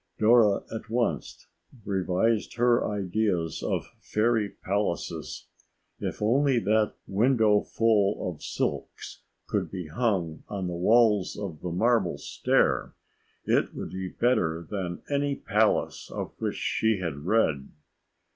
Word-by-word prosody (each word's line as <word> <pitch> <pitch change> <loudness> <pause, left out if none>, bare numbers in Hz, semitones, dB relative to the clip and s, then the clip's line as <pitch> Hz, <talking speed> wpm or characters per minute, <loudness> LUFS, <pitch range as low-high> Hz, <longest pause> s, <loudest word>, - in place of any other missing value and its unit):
Dora 110 -2 +4
at 110 - -6
once 120 +1 -2 0.4
revised 100 +3 0
her 120 0 +3
ideas 95 -4 -1
of - - -1
fairy 110 -1 +1
palaces. 100 -2 -3 0.5
If - - -4
only 135 +4 +3
that 110 0 +1
windowful 110 -1 +3
of 85 -4 -6
silks - - -4 0.2
could - - -1
be 90 -5 -6
hung 90 -5 -1
on 100 -3 -3
the 90 - -3
walls 105 +2 +3
of 95 -7 -6
the 90 - -3
marble 105 +1 +1
stair, - - 0 0.5
it - - +1
would - - -6
be 95 0 -4
better 85 -7 0
than 90 -3 -4
any 140 0 0
palace 110 -3 0
of - - -5
which - - -2
she 110 -1 +1
had 85 -6 -4
read. 75 -4 +1
105 Hz, 120 wpm, -27 LUFS, 90-115 Hz, 0.5 s, Dora